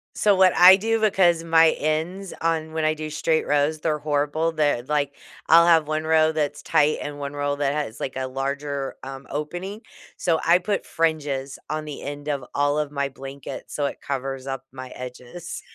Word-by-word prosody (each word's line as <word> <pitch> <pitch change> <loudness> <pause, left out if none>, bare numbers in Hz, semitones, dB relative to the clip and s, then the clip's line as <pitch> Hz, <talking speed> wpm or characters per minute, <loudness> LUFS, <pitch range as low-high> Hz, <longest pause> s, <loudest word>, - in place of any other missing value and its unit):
So, 205 -2 +3
what 185 -1 +5
I 185 +2 +10
do, 225 +3 0
because 180 -6 +3
my 165 -1 +5
ends 165 +6 -2
on 160 -1 -1
when 160 -1 -1
I 155 0 +2
do 155 0 -5
straight 160 +1 0
rows, 145 +2 +1
they're 155 -2 -1
horrible, 150 +2 0
they're 145 -6 +1
like, 145 0 -1 0.3
I'll 170 +1 +7
have 165 -3 +5
1one 155 0 -1
row 160 0 +3
that's 145 -2 -2
tight 150 +1 +2
and 145 0 -6
one 140 0 -5
row 145 0 -1
that 140 -1 0
has, 145 -7 -4
like, 130 - -4
a 130 0 -2
larger, 140 +1 -3
um, 135 0 -8
opening, 175 - -5 0.4
so, 165 -3 +1
I 170 +1 +5
put 200 +3 -2
fringes 145 -4 -1
on 155 0 -3
the 150 -2 -7
end 145 +1 -7
of 140 -3 -2
all 145 +1 +2
of 150 -1 -2
my 140 -1 -1
blankets 135 +1 -9
so 145 - 0
it - - -4
covers 135 -1 -4
up 135 0 -5
my 130 -1 -8
edges. 125 +7 -8
150 Hz, 195 wpm, -24 LUFS, 140-165 Hz, 0.4 s, I